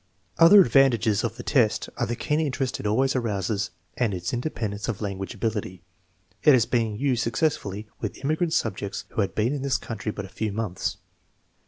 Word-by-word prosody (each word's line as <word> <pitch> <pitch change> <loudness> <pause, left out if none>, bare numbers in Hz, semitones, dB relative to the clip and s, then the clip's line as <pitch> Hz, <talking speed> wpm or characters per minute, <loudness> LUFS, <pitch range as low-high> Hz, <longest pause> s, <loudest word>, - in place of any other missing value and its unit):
Other 195 +5 +9
advantages 120 - +3
of 115 -1 -2
the 120 - -7
test 120 -7 +2
are - - -1
the 120 - -2
keen 150 +5 0
interest 135 -4 -1
it - - -3
always 130 +6 +2
arouses 105 -3 -1 0.3
and 115 -6 0
its 90 0 -4
independence 110 -5 -3
of 115 -5 -3
language 95 -2 -4
ability. 105 -5 -3 0.6
It 150 - +7
has 115 -3 +3
been 115 -4 0
used 125 0 0
successfully 115 -5 -1
with - - -4
immigrant 160 +3 0
subjects 100 -2 -2
who - - -1
had 100 - -2
been 115 +5 +1
in 145 - -3
this 135 -2 +1
country 110 -1 -5
but 100 -1 -6
a - - -11
few 110 +1 -3
months. 100 -3 -3
115 Hz, 185 wpm, -25 LUFS, 105-130 Hz, 0.6 s, Other